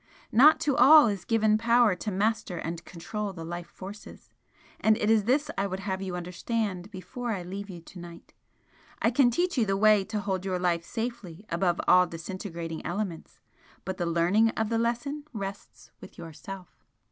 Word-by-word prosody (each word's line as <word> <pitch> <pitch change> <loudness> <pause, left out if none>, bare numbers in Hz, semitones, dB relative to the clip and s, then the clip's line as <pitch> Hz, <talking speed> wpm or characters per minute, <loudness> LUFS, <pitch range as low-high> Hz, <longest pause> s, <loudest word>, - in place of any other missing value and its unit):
Not 285 +8 +7
to 285 -3 +1
all 300 +2 +8
is 200 -4 -2
given 215 -2 +2
power 230 -1 +4
to 185 +4 -5
master 205 -2 -1
and 165 +1 -5
control 195 +4 -5
the 165 -3 -8
life 175 +1 -6
forces 200 +2 -11 0.5
and 220 0 +3
it 215 -1 +1
is 215 -3 +3
this 285 +6 +1
I 200 - +1
would 190 0 -5
have 190 -1 -3
you 185 -2 -4
understand 185 +2 -3
before 240 +5 -6
I 195 -5 -2
leave 200 +3 -7
you 175 -3 -8
to 180 +2 -13
night. 170 -1 -12 0.7
I 230 - +2
can 255 0 +4
teach 350 +4 0
you 225 - +3
the 195 0 +1
way 210 -1 +5
to 210 - -3
hold 190 -2 -2
your 190 -1 -1
life 175 -2 0
safely 225 -4 -6
above 170 0 +1
all 180 0 +6
disintegrating 170 -1 -6
elements 180 -2 -5 0.4
but 190 -1 -4
the 175 - -1
learning 175 +7 +3
of 220 -1 0
the 230 0 0
lesson 240 +6 -2
rests 200 -2 -8
with - - -13
yourself." 175 +3 -10
195 Hz, 180 wpm, -28 LUFS, 180-225 Hz, 0.7 s, all